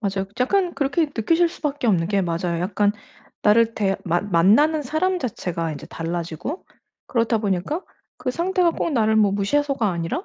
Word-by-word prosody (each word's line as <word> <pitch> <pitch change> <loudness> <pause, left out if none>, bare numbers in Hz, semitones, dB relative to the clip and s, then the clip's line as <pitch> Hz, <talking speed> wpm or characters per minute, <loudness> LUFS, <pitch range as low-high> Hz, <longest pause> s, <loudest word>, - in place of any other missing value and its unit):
맞아요. 195 -2 -2
약간 360 +6 +1
그렇게 290 +3 +1
느끼실 330 +7 +1
수 - - -13
밖에 290 -4 -1
없는 170 -6 +2
게 200 -2 +1
맞아요. 170 0 -2
약간 205 +2 +1 0.5
나를 230 +2 +4
대 195 -2 0
만 175 +4 -1
만나는 280 - +4
사람 355 +7 0
자체가 175 - -3
이제 145 - -8
달라지고 170 - -5 0.4
그렇다 230 -1 +1
보니까 210 - -1 0.3
그 255 - -3
상대가 355 +3 +1
꼭 330 - -2
나를 220 -3 +2
뭐 205 -2 +4
무시해서가 235 +2 0
아니라 170 - -3
220 Hz, 365 characters per minute, -22 LUFS, 185-295 Hz, 0.5 s, 나를